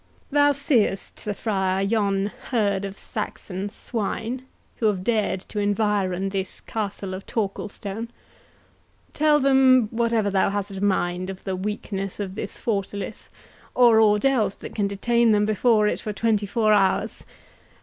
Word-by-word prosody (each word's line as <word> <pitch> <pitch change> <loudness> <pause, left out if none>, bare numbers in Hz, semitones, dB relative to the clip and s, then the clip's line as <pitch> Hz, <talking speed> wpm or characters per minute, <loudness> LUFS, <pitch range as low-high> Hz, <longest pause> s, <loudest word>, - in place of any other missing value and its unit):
"Thou 290 0 +5
seest, 260 -8 0
Sir 205 -1 -4
Friar, 190 -3 0
yon 200 -1 +1 0.2
herd 200 -5 +1
of 195 0 -7
Saxon 190 +1 -5
swine, 230 +3 -3 0.3
who 225 - +2
have 195 -3 0
dared 215 -4 0
to 210 - -6
environ 205 -2 0
this 195 -1 -4
castle 200 -3 -4
of 190 +1 -7
Torquilstone—Tell 225 +8 -3
them 260 -4 +5
whatever 230 -3 +1
thou 190 0 +2
hast 200 0 -3
a 195 0 -5
mind 185 -2 0
of 190 -1 -8
the 190 -2 -2
weakness 195 0 -4
of 195 -2 -4
this 205 0 -5
fortalice, 200 -2 -3 0.5
or 235 -3 +6
aught 210 +1 +4
else 245 -7 +2
that - - -9
can 205 -2 0
detain 235 +3 +2
them 210 0 +3
before 215 0 +3
it - - -1
for 215 - -4
twenty 210 -1 +1
four 215 +1 +2
hours. 195 -2 +1
205 Hz, 145 wpm, -24 LUFS, 195-230 Hz, 0.5 s, or